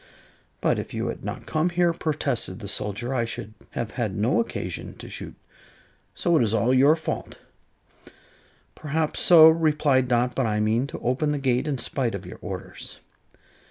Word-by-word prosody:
"But -, -, +2 dB
if -, -, -6 dB
you -, -, -2 dB
had -, -, -6 dB
not -, -, -5 dB
come 155 Hz, +3 st, 0 dB
here," 175 Hz, -1 st, +2 dB
protested 145 Hz, -, -2 dB
the 100 Hz, -, -8 dB
soldier, 105 Hz, +5 st, -2 dB
"I 120 Hz, -3 st, +1 dB
should 110 Hz, -2 st, -5 dB, 0.2 s
have 115 Hz, -1 st, -2 dB
had 115 Hz, -7 st, -3 dB
no 110 Hz, +4 st, +2 dB
occasion 235 Hz, -, -4 dB
to -, -, -10 dB
shoot. -, -, -7 dB, 0.8 s
So 170 Hz, -1 st, +1 dB
it 155 Hz, -, +4 dB
is 115 Hz, -1 st, +1 dB
all 115 Hz, +4 st, +2 dB
your 140 Hz, +4 st, +6 dB
fault." 160 Hz, -, -5 dB, 1.4 s
"Perhaps 155 Hz, +1 st, -2 dB
so," 160 Hz, -3 st, +8 dB
replied 150 Hz, -5 st, +3 dB
Dot; 125 Hz, 0 st, +1 dB
"but 130 Hz, -3 st, 0 dB
I 105 Hz, -1 st, 0 dB
mean 110 Hz, +5 st, +1 dB
to -, -, -7 dB
open 130 Hz, +5 st, 0 dB
the -, -, -1 dB
gate 130 Hz, 0 st, 0 dB
in 145 Hz, -3 st, -1 dB
spite 120 Hz, -2 st, -1 dB
of 100 Hz, -1 st, -7 dB
your 90 Hz, -, -10 dB
orders." -, -, -7 dB
130 Hz, 175 wpm, -25 LUFS, 115-155 Hz, 1.4 s, so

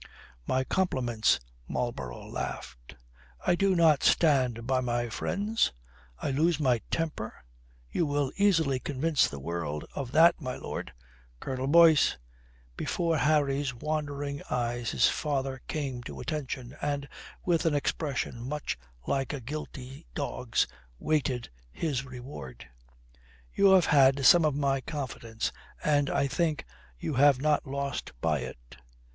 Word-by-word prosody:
"My 130 Hz, 0 st, +1 dB
compliments," 125 Hz, -, +1 dB, 0.3 s
Marlborough 65 Hz, -, -4 dB
laughed. -, -, -6 dB, 0.5 s
"I -, -, +4 dB
do 195 Hz, +1 st, +2 dB
not 160 Hz, -4 st, +5 dB
stand 130 Hz, -7 st, +3 dB
by 130 Hz, 0 st, +2 dB
my 120 Hz, -1 st, -1 dB
friends? 205 Hz, -, 0 dB, 0.5 s
I 140 Hz, -, -2 dB
lose 160 Hz, +3 st, +2 dB
my 125 Hz, -6 st, +2 dB
temper? 155 Hz, -9 st, -2 dB, 0.6 s
You 165 Hz, -, +1 dB
will 145 Hz, -2 st, 0 dB
easily 165 Hz, -10 st, +3 dB
convince 145 Hz, +3 st, +1 dB
the 70 Hz, -, -7 dB
world 75 Hz, 0 st, -4 dB
of 130 Hz, -3 st, -4 dB
that, 165 Hz, +1 st, +6 dB
my 130 Hz, -2 st, -3 dB
lord. -, -, -5 dB, 0.5 s
Colonel 130 Hz, -, -3 dB
Boyce!" 165 Hz, 0 st, +6 dB, 0.6 s
Before 165 Hz, -, 0 dB
Harry's 140 Hz, -1 st, +2 dB
wondering 145 Hz, 0 st, -3 dB
eyes 120 Hz, -1 st, -1 dB
his -, -, +4 dB
father 135 Hz, -3 st, -1 dB
came 135 Hz, -5 st, -3 dB
to -, -, -7 dB
attention 135 Hz, -4 st, -4 dB
and, 145 Hz, -1 st, -2 dB, 0.4 s
with 170 Hz, -2 st, +2 dB
an 150 Hz, -, +2 dB
expression 140 Hz, -4 st, -2 dB
much 150 Hz, -, -3 dB, 0.3 s
like 135 Hz, +1 st, -1 dB
a 145 Hz, -, -3 dB
guilty 135 Hz, -, -7 dB
dog's, -, -, 0 dB, 0.3 s
waited 130 Hz, -, -1 dB, 0.2 s
his 140 Hz, -, -2 dB
reward. 125 Hz, -, -9 dB, 0.9 s
"You 195 Hz, -1 st, +5 dB
have 185 Hz, -3 st, +6 dB
had 135 Hz, -2 st, +5 dB
some 170 Hz, +2 st, +8 dB
of 150 Hz, -3 st, +1 dB
my 140 Hz, -2 st, +1 dB
confidence 125 Hz, -6 st, -4 dB, 0.3 s
and 145 Hz, -2 st, +2 dB
I -, -, +1 dB
think 155 Hz, +2 st, 0 dB, 0.3 s
you 145 Hz, -, -3 dB
have 140 Hz, 0 st, +5 dB
not 150 Hz, +1 st, +1 dB
lost 140 Hz, 0 st, -3 dB
by 75 Hz, +1 st, +1 dB
it. -, -, -9 dB
140 Hz, 130 wpm, -29 LUFS, 125-155 Hz, 0.9 s, some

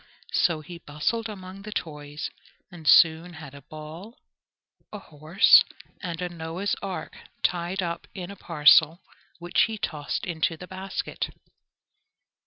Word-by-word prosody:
So 165 Hz, -3 st, +2 dB
he 170 Hz, +3 st, -10 dB
bustled 195 Hz, +10 st, -2 dB
among 190 Hz, -1 st, -9 dB
the 210 Hz, +1 st, -8 dB
toys, 150 Hz, -5 st, -5 dB, 0.4 s
and 165 Hz, -4 st, -10 dB
soon 165 Hz, +2 st, +6 dB
had 150 Hz, -3 st, -10 dB
a 140 Hz, -, -11 dB
ball, 155 Hz, -, -10 dB, 0.7 s
a 210 Hz, -, -6 dB
horse, 160 Hz, +1 st, +5 dB, 0.4 s
and 170 Hz, -3 st, -4 dB
a -, -, -1 dB
Noah's 170 Hz, +3 st, -3 dB
ark 195 Hz, -2 st, -5 dB, 0.3 s
tied 180 Hz, +2 st, 0 dB
up 170 Hz, -1 st, -4 dB
in 185 Hz, -1 st, -6 dB
a -, -, -9 dB
parcel, 160 Hz, 0 st, +5 dB, 0.3 s
which 175 Hz, 0 st, +2 dB
he 220 Hz, 0 st, -5 dB
tossed 150 Hz, -7 st, -3 dB
into 165 Hz, -1 st, -1 dB
the 180 Hz, -, -9 dB
basket. 190 Hz, +1 st, -4 dB
170 Hz, 135 wpm, -26 LUFS, 155-190 Hz, 0.7 s, soon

